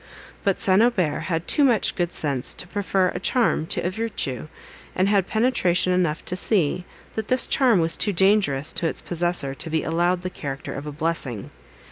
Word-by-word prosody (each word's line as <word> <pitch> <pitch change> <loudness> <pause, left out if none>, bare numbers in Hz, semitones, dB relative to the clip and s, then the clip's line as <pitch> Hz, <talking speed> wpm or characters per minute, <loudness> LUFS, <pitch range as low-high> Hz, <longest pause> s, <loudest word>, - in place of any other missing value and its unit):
But 195 -2 +1
St. 190 +1 +3
Aubert 185 -10 +1
had 165 -1 -2
too 295 - +3
much 240 -7 +2
good 175 -2 -1
sense 140 -5 -2
to - - -5
prefer 190 -1 0
a - - -4
charm 210 -6 +1
to - - -1
a 180 - 0
virtue; 190 - -3 0.5
and 185 - +2
had 200 -2 +2
penetration 200 -6 +1
enough 170 -4 0
to 180 - -2
see, 180 -3 0 0.3
that 220 -1 -4
this 255 -1 +2
charm 250 -8 +3
was 165 0 +2
too 205 - +1
dangerous 190 -7 +2
to 170 - -1
its - - -3
possessor 175 -5 -1
to 160 - -6
be 160 0 0
allowed 175 +2 0
the 185 - -4
character 135 -4 -6
of 145 +2 -6
a - - -4
blessing. 145 -8 -3
180 Hz, 190 wpm, -23 LUFS, 160-200 Hz, 0.5 s, St